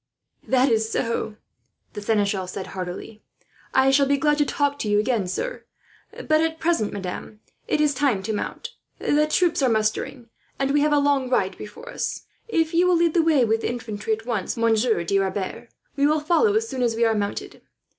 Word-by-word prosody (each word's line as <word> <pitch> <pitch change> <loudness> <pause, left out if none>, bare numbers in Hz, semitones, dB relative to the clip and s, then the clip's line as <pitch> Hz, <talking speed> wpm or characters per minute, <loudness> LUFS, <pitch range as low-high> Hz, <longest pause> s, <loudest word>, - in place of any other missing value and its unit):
"That 260 0 +3
is 220 0 +1
so," 230 -2 -2 0.6
the 210 - -6
seneschal 205 -3 0
said 185 +1 -5
heartily. 190 +4 -6 0.5
"I 265 0 +4
shall 275 0 +4
be 280 0 +2
glad 295 +1 +2
to 295 - +4
talk 285 0 0
to 215 - -2
you 205 - +3
again, 215 -3 +1
sir; - - -4 0.5
but 310 0 +1
at 325 0 -1
present, 330 -11 +1
madame, 200 +2 -6 0.3
it - - +1
is 300 -1 +3
time 260 -9 +1
to 220 +2 -2
mount. 205 - -5 0.2
The 300 +1 +2
troops 340 0 +2
are 260 - +3
mustering, 225 +3 -1 0.3
and 270 0 0
we 290 0 +3
have 300 +1 +2
a 295 - +4
long 285 -2 +2
ride 190 -6 +1
before 455 - -10
us. - - -4 0.2
"If 325 -7 0
you 350 +2 +4
will 360 - +4
lead 335 -1 +2
the 340 - +4
way 310 -6 +3
with 225 0 +1
the - - -1
infantry 225 -3 -3
at 220 +1 -5
once, 230 -5 -2
Monsieur 225 -4 +2
de 195 +3 +1
Rebers, 195 +4 -3 0.3
we 280 0 +3
will 305 +1 +2
follow 345 +8 +2
as 445 +1 +1
soon 260 - -4
as 235 -2 +1
we 230 +1 +2
are 225 - +3
mounted. 205 -1 -4
250 Hz, 205 wpm, -23 LUFS, 215-300 Hz, 0.6 s, I